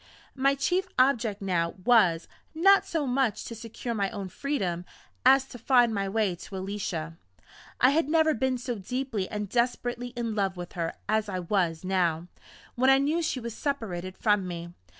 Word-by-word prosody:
My 275 +1 +2
chief 360 +7 0
object 235 -6 +2
now 170 -3 0
was, 190 -9 +4 0.3
not 390 +4 +5
so 325 -6 -1
much 255 -4 0
to - - -6
secure 230 +1 -6
my 200 -3 0
own 200 -4 -6
freedom, 190 -11 -2 0.4
as 265 0 +6
to 245 - -10
find 245 -1 +4
my 200 -1 -1
way 210 -2 +1
to 185 +2 -8
Alicia. 185 -4 -4 0.6
I 255 - +6
had 310 0 +1
never 315 0 +4
been 260 +1 0
so 245 0 -3
deeply 230 -1 -3
and 210 -1 -3
desperately 245 +2 -1
in 235 -2 -2
love 195 -3 -1
with 175 0 -7
her 165 -2 -2
as 215 0 +1
I 185 - -2
was 175 -3 0
now, 175 -3 0 0.5
when 260 +2 +3
I 270 - +7
knew 300 +5 +1
she 320 -5 -1
was 235 -2 -6
separated 190 -10 -4
from 205 -3 +2
me. 170 -1 -6
225 Hz, 175 wpm, -27 LUFS, 185-265 Hz, 0.6 s, I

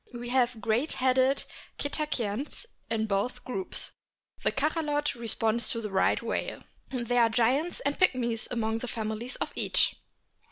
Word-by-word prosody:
We 240 0 -5
have 250 -2 +2
great 235 +7 +1
headed 260 +1 +3 0.3
Cetaceans 285 - -2 0.2
in 220 -1 +1
both 220 +5 -1
groups. 365 +9 -4 0.5
The - - +2
Cachalot 295 0 0
corresponds 230 -1 0
to 230 - 0
the 210 -2 -4
Right 190 - +3
whale. - - -2 0.3
There 245 -1 +1
are 230 - +5
giants 255 +9 +2
and 285 +1 -1
pigmies 240 -10 +2
among 225 -2 0
the 250 - -5
families 220 +2 -3
of - - -3
each. - - +3
245 Hz, 145 wpm, -29 LUFS, 225-275 Hz, 0.5 s, are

